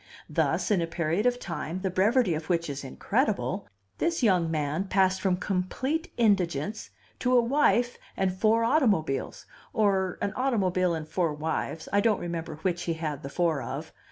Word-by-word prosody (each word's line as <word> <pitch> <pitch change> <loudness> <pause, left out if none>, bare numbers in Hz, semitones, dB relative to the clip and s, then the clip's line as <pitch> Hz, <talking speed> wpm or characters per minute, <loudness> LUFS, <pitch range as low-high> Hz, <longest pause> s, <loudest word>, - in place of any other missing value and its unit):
Thus, - - 0
in 195 -4 +3
a 165 - -1
period 170 +6 0
of 245 0 +2
time 180 -4 -5
the 190 -1 -1
brevity 205 +2 +3
of 155 +2 -5
which 170 -3 0
is 140 0 -6
incredible, 200 - -1 0.3
this 335 -5 0
young 180 -7 +3
man 155 +3 -1
passed 190 -1 +2
from 185 -2 +1
complete 260 - -2
indigence 200 - +1 0.3
to 250 0 +3
a - - +7
wife 245 -1 +2 0.2
and 190 -1 +1
four 220 +4 +3
automobiles, 205 - +1 0.3
or 190 -4 +1
an 200 - -2
automobile 185 -9 +1
and 155 -1 -5
four 165 -1 0
wives 160 +1 -3
I 200 - +4
don't 215 -2 +2
remember 165 -2 -4
which 175 -2 0
he 170 - 0
had 155 -3 -4
the 140 - -6
four 165 -2 0
of. - - -6
185 Hz, 170 wpm, -28 LUFS, 165-220 Hz, 0.3 s, a